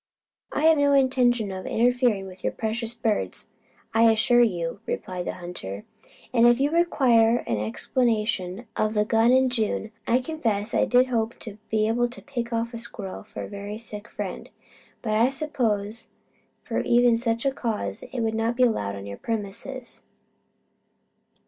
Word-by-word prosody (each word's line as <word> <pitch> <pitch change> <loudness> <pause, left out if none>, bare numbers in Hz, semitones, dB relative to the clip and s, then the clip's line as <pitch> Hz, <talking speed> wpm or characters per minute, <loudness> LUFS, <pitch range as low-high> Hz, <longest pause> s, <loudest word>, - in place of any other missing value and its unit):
"I - - -1
have 320 -1 +5
no 285 0 +4
intention 250 -5 +3
of 185 0 -6
interfering 240 -4 +2
with 185 -1 -12
your - - 0
precious 225 +1 -3
birds, 215 - -1 0.5
I 225 0 +6
assure 240 +2 +4
you," 175 -6 0
replied 180 -1 -4
the - - -2
hunter. 175 - -7 0.5
"And 235 -1 +6
if 240 +1 +5
you 285 +2 +2
require 245 -9 +3
an 110 -3 -1
explanation 210 - -1
of 215 0 0
the 210 0 +3
gun 225 +2 +3
in 260 0 +4
June, 220 -2 -1 0.2
I 240 - +4
confess 235 -7 -2
I - - +3
did 250 +1 +4
hope 230 -2 -1
to 215 -1 -8
be 215 -1 +2
able 240 +2 +2
to 220 -5 -10
pick 240 -2 -4
off 230 +1 -1
a 230 - -5
squirrel 200 -4 -6
for - - -8
a - - -6
very 205 +1 -6
sick 215 -1 -7
friend. - - -6 0.5
But 215 -2 -1
I 235 +3 +4
suppose 230 -7 -1 0.6
for - - -2
even 240 0 +4
such 230 +1 -1
cause 210 - -3
it 250 - -3
would 220 -1 0
not 225 +2 0
be 255 - +4
allowed 100 - +1
on 100 0 -8
your 100 0 -7
premises." 230 +4 -5
230 Hz, 170 wpm, -25 LUFS, 205-245 Hz, 0.6 s, I